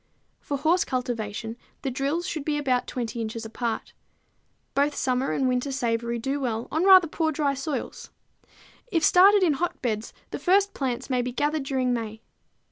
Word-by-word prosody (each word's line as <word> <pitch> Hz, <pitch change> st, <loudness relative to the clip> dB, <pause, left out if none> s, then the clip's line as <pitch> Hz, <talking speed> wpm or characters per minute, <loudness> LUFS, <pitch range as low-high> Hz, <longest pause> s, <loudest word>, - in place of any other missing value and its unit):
For 285 Hz, -, -3 dB
horse 325 Hz, +6 st, +3 dB
cultivation 230 Hz, -3 st, -3 dB, 0.3 s
the 270 Hz, -, -1 dB
drills 280 Hz, +7 st, -1 dB
should 310 Hz, -4 st, -3 dB
be 295 Hz, 0 st, -1 dB
20 250 Hz, -3 st, -1 dB
inches 225 Hz, 0 st, -4 dB
apart. 225 Hz, 0 st, -4 dB, 0.8 s
Both 290 Hz, +1 st, +1 dB
summer 255 Hz, 0 st, 0 dB
and 265 Hz, -, +1 dB
winter 255 Hz, +2 st, 0 dB
savory 235 Hz, -2 st, -1 dB
do 270 Hz, +5 st, -2 dB
well 235 Hz, -3 st, -2 dB
on 320 Hz, +5 st, +1 dB
rather 375 Hz, -3 st, +8 dB
poor 315 Hz, +1 st, 0 dB
dry 285 Hz, -2 st, 0 dB
soils. 275 Hz, +2 st, -5 dB, 0.8 s
If 330 Hz, -3 st, +1 dB
started 390 Hz, +2 st, +6 dB
in 330 Hz, -5 st, +4 dB
hotbeds, 245 Hz, -8 st, -2 dB, 0.2 s
the -, -, -4 dB
first 395 Hz, +2 st, +3 dB
plants 260 Hz, -1 st, -3 dB
may 250 Hz, -1 st, +2 dB
be 250 Hz, +1 st, -3 dB
gathered 295 Hz, +3 st, -1 dB
during 260 Hz, -2 st, 0 dB
May. 220 Hz, -2 st, -4 dB
265 Hz, 160 wpm, -26 LUFS, 240-305 Hz, 0.8 s, rather